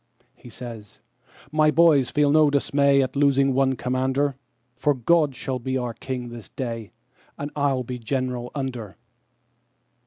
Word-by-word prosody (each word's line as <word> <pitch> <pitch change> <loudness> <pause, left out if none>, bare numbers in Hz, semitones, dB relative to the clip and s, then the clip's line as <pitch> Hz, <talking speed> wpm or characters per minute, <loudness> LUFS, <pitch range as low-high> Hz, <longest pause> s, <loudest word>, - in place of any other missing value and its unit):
He 120 - -14
says, 115 -4 -10 0.5
"My 155 0 +4
boys 155 -6 +4
feel 145 +3 +2
no 155 0 +5
dismay 140 -1 +3
at 130 0 -4
the 140 - -2
losing 140 -1 +4
of - - 0
one 135 0 +2
commander, 130 +3 0 0.4
For 145 +4 +1
God 150 +2 +2
shall 130 +1 -4
be 130 +2 -2
our 125 -2 -3
King 125 0 -5
this 120 -4 -10
day, 115 -5 -5 0.5
and 145 +1 -5
I'll 140 -3 +1
be 125 +1 -6
general 125 0 -3
under." 125 -7 -5
130 Hz, 155 wpm, -24 LUFS, 125-140 Hz, 0.5 s, no